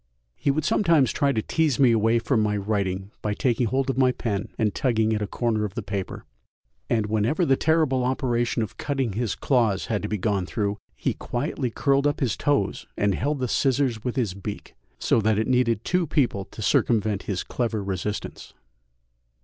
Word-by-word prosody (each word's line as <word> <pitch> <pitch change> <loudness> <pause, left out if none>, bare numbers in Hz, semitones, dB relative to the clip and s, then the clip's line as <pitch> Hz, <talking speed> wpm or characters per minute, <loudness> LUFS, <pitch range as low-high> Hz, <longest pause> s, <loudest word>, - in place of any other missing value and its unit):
He - - -1
would 150 +2 +1
sometimes 165 -9 +3
try 140 -1 +2
to 110 -5 -1
tease 155 -6 +1
me 130 -3 +6
away 115 +1 +3
from 115 0 +1
my 105 -1 +1
writing 100 -1 -2
by 105 -1 -1
taking 120 0 +1
hold 130 +4 0
of 135 -1 -1
my 130 -1 +5
pen 105 -5 -3
and 105 -3 +1
tugging 110 -5 +1
at 105 - -1
a 105 - -1
corner 110 0 -1
of 100 -3 -4
the - - -3
paper, 100 -2 -5 0.6
and 110 -3 +1
whenever 110 - +1
the 135 - +4
terrible 150 -4 +2
operation 120 -2 0
of 110 - -7
cutting 135 -7 -1
his 115 +1 -1
claws 115 -8 +1
had 105 - 0
to 105 - -3
be 105 - -2
gone 100 -2 -1
through, 105 -1 -2 0.2
he - - -1
quietly 125 0 -3
curled 140 +4 +2
up 145 - -1
his 125 -6 0
toes 140 -10 0
and 100 -1 +2
held 145 +10 -1
the 130 -1 -1
scissors 130 -3 +1
with 125 -1 -2
his 115 -8 0
beak, 100 +2 -7 0.2
so 115 - +2
that 110 0 +2
it 110 - +1
needed 125 -3 +1
two 180 -2 +1
people 125 -10 +1
to 110 - -9
circumvent 105 -2 +2
his 95 -3 -1
clever 115 -4 -2
resistance. 100 +2 -5
115 Hz, 195 wpm, -25 LUFS, 105-135 Hz, 0.6 s, me